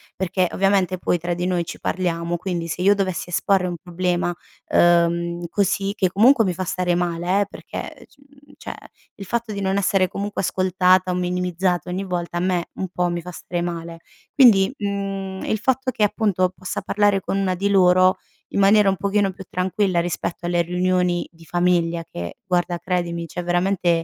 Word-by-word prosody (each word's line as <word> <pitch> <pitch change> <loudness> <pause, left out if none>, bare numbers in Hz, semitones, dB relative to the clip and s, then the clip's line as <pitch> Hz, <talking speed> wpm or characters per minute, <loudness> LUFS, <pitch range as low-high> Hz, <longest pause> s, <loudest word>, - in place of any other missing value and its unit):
perché 185 0 0
ovviamente 195 -1 +1
poi 175 - +1
tra 175 +1 -3
di 175 +1 -2
noi 180 -2 0
ci - - -8
parliamo, 170 -2 -1
quindi 175 -2 -3
se 170 +2 -4
io 200 +2 +6
dovessi 185 -3 -2
esporre 185 +1 +1
un 175 -1 -4
problema, 175 -1 -1 0.4
uhm, 170 0 +3
così, 200 +1 0
che 185 -4 +1
comunque 230 +6 +5
mi 185 - 0
fa 185 +2 -4
stare 180 0 0
male, 175 +3 0
perché - - -8
c - - -27 0.4
cioè, - - -7 0.4
il 200 - -9
fatto 235 +2 -2
di 200 - -4
non 190 0 0
essere 190 -1 +2
comunque 205 +1 -3
ascoltata 185 0 +2
o - - -1
minimizzata 180 0 -1
ogni 185 +2 -2
volta, 175 -2 -3
a - - 0
me, 180 -1 0
un 190 - -4
po', 180 0 -1
mi 175 0 -3
fa 180 +2 -8
stare 175 0 -4
male. 170 -1 -5 0.3
Quindi, 220 -7 +6
mhmm, 195 -2 -4
il 220 - 0
fatto 260 +2 0
che 215 - -1
appunto 195 -4 +1
possa 185 - -5
parlare 205 -1 +2
con 195 - -2
1 190 -2 0
di 200 +3 -1
loro, 185 -1 +5 0.3
in - - -1
maniera 200 +1 +5
un 190 - 0
pochino 200 +1 +1
più 190 +1 -11
tranquilla, 185 0 0
rispetto 175 0 -4
alle 175 0 +2
riunioni 180 0 0
di 165 0 -18
famiglia, 170 0 +1
che 85 - -7
guarda, 175 -2 0
credimi, 170 -2 -2
c'è 175 +2 -6
veramente, 175 +1 +1
180 Hz, 180 wpm, -22 LUFS, 175-195 Hz, 0.4 s, io